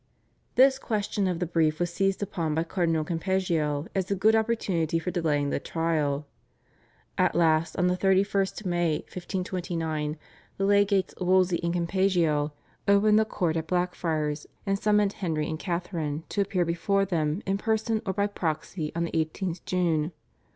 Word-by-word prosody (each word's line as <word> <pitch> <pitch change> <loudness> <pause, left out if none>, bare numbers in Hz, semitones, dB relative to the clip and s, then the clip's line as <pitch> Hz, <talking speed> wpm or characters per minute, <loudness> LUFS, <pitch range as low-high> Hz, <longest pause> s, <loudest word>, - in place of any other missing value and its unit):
This 265 +1 +5
question 205 -4 -1
of 180 -2 -1
the 175 - -1
brief 160 -2 +1
was 175 -1 -1
seized 195 +2 0
upon 165 -6 -2
by 160 - +1
Cardinal 165 -2 0
Campeggio 165 -3 0
as 190 -1 -1
a 200 - +1
good 215 +4 +4
opportunity 195 -8 0
for 165 +2 -2
delaying 150 -5 0
the - - 0
trial. 155 -3 -1 0.9
At - - +3
last 160 -1 +2
on 180 - +2
the 180 0 +2
31st 195 +2 +1
May 175 -3 +1
1529, 170 -4 -3 0.4
the 195 - 0
legates 200 -1 +3
Wolsey 185 -1 +3
and 170 0 0
Campeggio 170 -4 +1 0.4
opened 210 +2 +5
the 220 - +3
court 175 -6 -1
at 160 -1 -2
Blackfriars, 160 -4 -1 0.2
and 195 0 0
summoned 210 -1 +2
Henry 160 -5 -2
and 155 -1 -4
Catharine 170 -4 -3
to 205 - 0
appear 185 -3 0
before 195 +4 +1
them 165 0 -1
in 195 0 0
person 220 0 0
or 190 - -2
by 200 0 +1
proxy 160 -4 -3
on 170 - 0
the 170 - -3
18th 165 +2 -2
June. 170 -3 0
175 Hz, 160 wpm, -27 LUFS, 160-195 Hz, 0.9 s, This